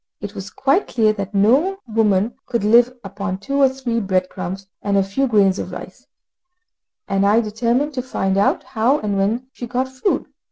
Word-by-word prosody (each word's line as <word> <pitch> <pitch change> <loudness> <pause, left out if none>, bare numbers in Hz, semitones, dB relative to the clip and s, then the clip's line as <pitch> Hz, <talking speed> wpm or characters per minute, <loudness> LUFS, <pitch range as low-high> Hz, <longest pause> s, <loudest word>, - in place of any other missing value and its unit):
It 205 -1 -7
was 200 -1 -7
quite 275 +9 +1
clear 220 -3 +2
that 200 -1 -5
no 270 - +3
woman 215 -1 +2
could 235 -4 -1
live 235 +3 +5
upon 200 -1 -4
two 275 +8 -3
or 270 - +6
three 260 -3 -2
bread 185 -3 0
crumbs 190 +1 -6 0.2
and 200 -1 0
a 195 - +4
few 235 +8 -1
grains 200 -5 +3
of - - -5
rice, - - -10 1.0
and 195 0 +1
I 205 +3 +4
determined 235 +6 0
to 255 - -2
find 195 -6 -1
out 200 +1 +2
how 255 +2 +1
and 210 -7 -2
when 210 +6 0
she 240 - -7
got 255 +2 -1
food. 260 +10 -1
215 Hz, 190 wpm, -20 LUFS, 200-255 Hz, 1.0 s, or